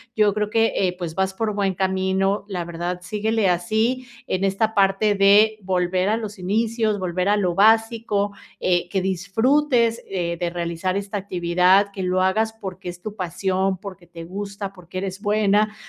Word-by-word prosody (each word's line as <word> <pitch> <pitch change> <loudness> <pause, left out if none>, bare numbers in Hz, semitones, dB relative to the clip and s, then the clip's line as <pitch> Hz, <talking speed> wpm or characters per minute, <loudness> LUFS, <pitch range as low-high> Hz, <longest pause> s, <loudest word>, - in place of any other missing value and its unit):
Yo 210 -2 +3
creo 210 0 -1
que, 225 +1 +2
eh, 180 -2 0
pues, 175 -3 -5
vas 190 +2 -1
por 215 +2 -2
buen 200 -2 0
camino. 190 +1 0
La 185 -4 -3
verdad 175 +1 -4
síguele 210 +2 0
así, 220 +8 0 0.2
en 185 +1 -1
esta 215 +3 0
parte 200 +1 +3
de 205 +2 +5
volver 185 0 0
a 215 - +2
los 210 -2 -6
inicios, 215 +2 0
volver 180 0 -1
a 210 - +4
lo 180 -3 +1
básico, 220 0 +2 0.3
eh, 175 -1 +1
que 190 +1 0
disfrutes, 230 - +2 0.2
eh, 170 -3 -2
de 175 -1 -1
realizar 170 +2 -2
esta 200 +1 -4
actividad. 180 +1 +3
Que 195 -1 -5
lo 185 0 +1
hagas 220 +4 +1
porque 190 -4 -7
es 175 0 -9
tu 210 +1 -7
pasión, 190 +1 -1
porque 185 -2 -10
te 165 -1 -10
gusta, 200 +2 -6
porque 180 0 -8
eres 195 0 -5
buena, 210 0 +2
195 Hz, 175 wpm, -22 LUFS, 180-215 Hz, 0.3 s, de